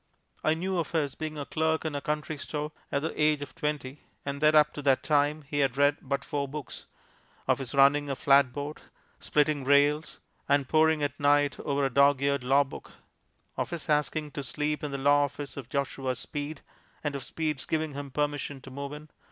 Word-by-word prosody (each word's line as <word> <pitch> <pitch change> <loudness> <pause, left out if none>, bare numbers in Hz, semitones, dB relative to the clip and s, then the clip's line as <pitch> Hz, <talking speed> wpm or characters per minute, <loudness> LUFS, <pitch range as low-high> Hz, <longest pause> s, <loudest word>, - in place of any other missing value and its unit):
I 155 - +3
knew 185 +2 -1
of 165 0 -3
his 145 -5 0
being 155 +1 -5
a 145 - -4
clerk 160 +1 0
in 155 - -2
a 145 - -3
country 150 0 -3
store 150 +1 -4 0.2
at 140 +1 0
the 160 - -2
age 150 -1 +3
of 135 - -10
twenty, 150 -4 -3 0.2
and 140 +1 -4
that 155 0 +5
up 150 0 +5
to 145 - -6
that 135 -2 +3
time 150 0 +2
he 145 +1 -3
had 135 -2 +1
read 145 0 +4
but 135 0 -3
four 145 -2 -2
books; 145 -1 -8 0.6
of - - +3
his 135 -1 -4
running 140 +1 +5
a 135 - -1
flatboat, 140 +2 +2 0.4
splitting 150 -1 +1
rails, 145 +3 +3 0.3
and 140 -1 +3
poring 155 0 +3
at 145 - -2
night 145 0 +3
over 140 -1 0
a 135 - -2
dog 140 0 +5
eared 140 -2 +1
law 135 +3 +4
book; 140 - -11 0.6
of - - -2
his 170 -2 -5
asking 150 0 0
to 140 - -4
sleep 150 +3 -2
in 150 - -2
the 140 - -3
law 145 +1 +4
office 140 0 -7
of 130 -4 -8
Joshua 135 -2 -2
Speed, 145 +2 -5 0.4
and 145 -2 -2
of 140 - -4
Speed's 155 -4 -3
giving 160 -2 -1
him 140 0 -6
permission 145 0 -2
to 135 - -11
move 140 +2 -5
in. 150 +1 -9
145 Hz, 205 wpm, -28 LUFS, 140-150 Hz, 0.6 s, that